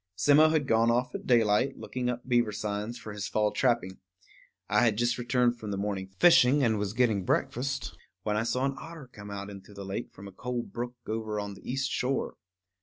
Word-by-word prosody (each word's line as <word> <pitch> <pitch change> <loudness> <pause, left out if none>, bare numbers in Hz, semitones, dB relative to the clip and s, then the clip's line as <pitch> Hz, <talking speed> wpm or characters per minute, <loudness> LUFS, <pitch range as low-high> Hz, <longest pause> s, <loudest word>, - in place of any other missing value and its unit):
Simmo 145 +11 +5
had 155 -3 +1
gone 115 0 +3
off 125 +1 +1
at - - -6
daylight, 120 +2 +3
looking 125 -1 -3
up 125 0 -4
beaver 120 -3 +2
signs 105 +3 -3
for 110 -3 -8
his 105 -1 -4
fall 105 -1 +1
trapping. 115 -7 0 0.7
I - - +3
had 110 -3 +3
just 120 +1 +1
returned 120 0 +1
from 110 - -6
the 100 - -2
morning 100 -1 -3
fishing, 145 -5 +6
and 110 -3 +2
was 100 -1 -2
getting 110 -5 +2
breakfast, 135 +6 -1 0.3
when 105 -1 0
I 105 - +1
saw 125 +3 0
an 135 - 0
otter 160 -6 -10
come 105 -1 -10
out 100 0 -6
into 100 +1 -12
the 100 0 -7
lake 95 +1 -5
from 100 +1 -11
a - - -10
cold 125 +5 -5
brook 120 +1 -4
over 110 -1 -3
on 100 0 -4
the 100 - -8
east 135 +1 -1
shore. 130 +1 -1
115 Hz, 210 wpm, -29 LUFS, 105-125 Hz, 0.7 s, fishing